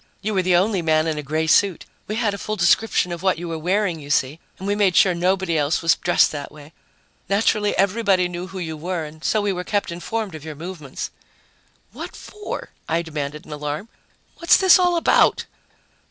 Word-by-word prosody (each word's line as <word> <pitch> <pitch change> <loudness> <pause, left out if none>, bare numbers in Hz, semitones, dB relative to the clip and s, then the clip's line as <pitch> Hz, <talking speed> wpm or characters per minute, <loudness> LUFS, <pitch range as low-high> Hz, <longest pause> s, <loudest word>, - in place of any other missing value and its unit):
"You 215 +1 -1
were 190 - +2
the 180 -1 +2
only 190 +1 +2
man 155 -1 +2
in 155 -2 -1
a - - -3
gray 155 +3 -1
suit. 185 +2 +3 0.2
We 215 - -3
had 220 -3 0
a 200 - -6
full 215 - -3
description 180 0 +2
of 170 -1 -5
what 190 -3 +2
you 175 +1 -6
were 165 -1 -4
wearing, 180 0 0
you 145 -1 -11
see, 140 +2 +1 0.2
and 190 - -6
we 205 - +1
made 200 -4 +2
sure 185 +3 +5
nobody 180 0 0
else 150 +3 0
was 165 - +4
dressed 175 - +3
that 145 -2 -6
way. 150 +1 -14 0.6
Naturally, 210 +1 +1
everyone 195 -3 +2
knew 175 +1 -5
who 190 0 -9
you 160 -3 -4
were, 170 +2 -3
and 155 +1 -12
so 215 - +1
we 200 -1 0
were 180 0 -4
kept 205 -2 -1
informed 200 +3 -4
of 155 -2 -9
your 155 -1 -7
movements." 155 -3 -7 0.8
"What - - -8
for?" 420 0 -7 0.2
I 165 +1 +1
demanded 150 -2 -5
in - - -12
alarm. 150 +7 -5 0.5
"What's 335 - +5
this 375 -1 +6
all 355 -1 +3
about?" 335 - +3
180 Hz, 210 wpm, -22 LUFS, 155-200 Hz, 0.8 s, this